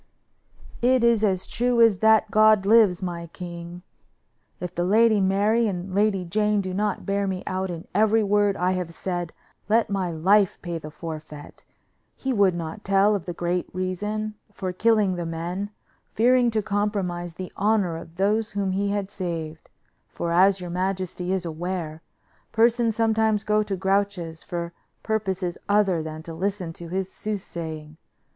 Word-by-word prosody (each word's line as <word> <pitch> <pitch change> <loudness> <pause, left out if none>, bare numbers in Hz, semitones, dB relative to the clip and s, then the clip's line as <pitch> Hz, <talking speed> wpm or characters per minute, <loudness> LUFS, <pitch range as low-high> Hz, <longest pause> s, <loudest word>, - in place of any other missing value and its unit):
"It 250 0 +3
is 235 -2 +4
as 190 -3 +1
true 245 0 0
as 225 -5 +5
that 220 -1 +4
God 215 -2 +5
lives, 205 -4 +5
my 170 -2 -4
king! 175 +1 -8 0.8
If 180 0 -5
the 175 - -1
Lady 215 +2 +4
Mary 205 +4 +2
and 185 -1 -4
Lady 200 -2 +1
Jane 210 +4 +1
do 185 -2 -3
not 205 +2 -1
bear 200 0 0
me 190 -1 -3
out 190 0 -2
in 170 -1 -6
every 220 +2 +3
word 205 0 +2
I 180 +1 +1
have 180 -3 -3
said, 175 -2 -3 0.4
let 225 -1 +3
my 190 -3 0
life 190 +5 +3
pay 170 -2 -3
the 155 - -8
forfeit. 155 -2 -9 0.5
He 265 -1 -2
would 200 -5 +3
not 170 +5 -6
tell 195 +2 +3
of 195 -4 -3
the 175 - -3
great 175 +1 -1
reason 210 +4 -2 0.2
for 185 -2 -4
killing 210 -2 +2
the 175 - -3
men, 175 +5 -4 0.5
fearing 245 +2 +4
to 220 -2 -1
compromise 195 -5 -2
the 185 0 -7
honor 200 -4 +1
of 165 0 -10
those 210 +4 +1
whom 200 -2 -1
he 200 +2 0
had 200 -1 -2
saved, 165 -4 -5 0.4
for, 170 - -4
as 190 +3 +4
your 180 -1 -6
majesty 185 0 -2
is 190 -2 -1
aware, 165 -1 -4 0.5
persons 230 0 +3
sometimes 220 -2 +2
go 215 0 +2
to 205 -2 -2
Grouche's 190 -4 -1
for 170 -1 -5 0.3
purposes 190 -5 -2
other 200 -5 +3
than 155 0 -7
to 165 - -8
listen 185 0 -3
to 170 +1 -9
his 190 +2 -3
soothsaying. 160 -7 -6
190 Hz, 165 wpm, -24 LUFS, 175-210 Hz, 0.8 s, as